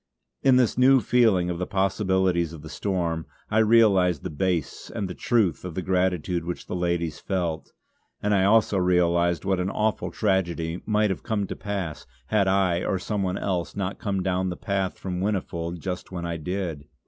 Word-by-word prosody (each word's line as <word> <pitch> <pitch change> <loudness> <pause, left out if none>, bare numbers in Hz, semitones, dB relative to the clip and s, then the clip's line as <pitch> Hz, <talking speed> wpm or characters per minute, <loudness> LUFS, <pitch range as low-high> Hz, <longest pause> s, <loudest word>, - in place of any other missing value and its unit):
In 130 - +5
this 125 -1 +2
new 130 +1 +6
feeling 105 -6 +3
of 85 - -4
the 90 - -2
possibilities 95 -3 +1
of 80 -2 -10
the 80 - -9
storm, 85 -3 -2 0.2
I 110 - +3
realised 100 -8 +4
the - - -4
base 85 0 -2
and 100 - -3
the 90 - -5
truth 110 -6 +1
of 90 -3 -6
the 95 - -2
gratitude 90 -2 0
which 85 +1 -5
the - - -5
ladies 85 -3 -1
felt; 85 -5 -3 0.5
and 105 0 0
I 95 -2 +3
also 105 -1 +4
realised 85 -1 +2
what 95 -1 +1
an 90 +1 -1
awful 105 +2 -1
tragedy 85 -4 -1
might 105 -1 +2
have 95 - -4
come 105 -3 -1
to 95 - -6
pass 95 -9 -5 0.2
had 100 -3 +2
I 95 -2 +2
or 95 - 0
some 100 +3 -2
one 95 -1 -1
else 90 -3 -2
not 100 -1 -3
come 100 -3 -1
down 95 0 0
the 90 - -5
path 95 -3 -2
from 90 -1 -4
Whinnyfold 90 -4 -2
just 90 +3 -5
when 85 -2 -4
I 85 -1 -3
did. 85 -3 -4
95 Hz, 190 wpm, -25 LUFS, 85-100 Hz, 0.5 s, new